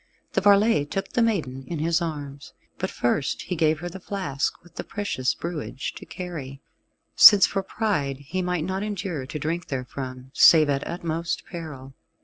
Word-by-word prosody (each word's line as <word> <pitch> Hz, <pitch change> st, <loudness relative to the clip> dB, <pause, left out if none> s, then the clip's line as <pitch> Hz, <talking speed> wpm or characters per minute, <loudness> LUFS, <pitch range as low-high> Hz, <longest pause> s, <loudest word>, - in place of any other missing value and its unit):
The -, -, +2 dB
varlet 200 Hz, -6 st, +4 dB
took 195 Hz, 0 st, -3 dB
the 240 Hz, -, 0 dB
maiden 155 Hz, -, 0 dB
in 170 Hz, -, -4 dB
his 165 Hz, +3 st, +1 dB
arms, 145 Hz, -4 st, -6 dB, 0.3 s
but -, -, -1 dB
first 135 Hz, +4 st, -1 dB
he 180 Hz, -, -3 dB
gave 155 Hz, -1 st, +1 dB
her 175 Hz, -, -4 dB
the 185 Hz, +2 st, -8 dB
flask 160 Hz, -10 st, -3 dB
with 175 Hz, -, -19 dB
the -, -, -5 dB
precious 200 Hz, -, -2 dB
brewage 160 Hz, -5 st, -5 dB
to -, -, -11 dB
carry, 150 Hz, -7 st, -7 dB, 0.6 s
since 205 Hz, -3 st, +10 dB
for 195 Hz, -, -1 dB
pride 190 Hz, -10 st, -1 dB
he 145 Hz, +7 st, -4 dB
might 180 Hz, -3 st, -1 dB
not 190 Hz, +3 st, -2 dB
endure 195 Hz, -9 st, -4 dB
to 155 Hz, -, -5 dB
drink 165 Hz, +4 st, -3 dB
therefrom, 130 Hz, -1 st, -6 dB
save 155 Hz, +1 st, +7 dB
at 140 Hz, 0 st, -2 dB
utmost 165 Hz, -1 st, -3 dB
peril. 150 Hz, -7 st, -8 dB
160 Hz, 170 wpm, -25 LUFS, 140-185 Hz, 0.6 s, since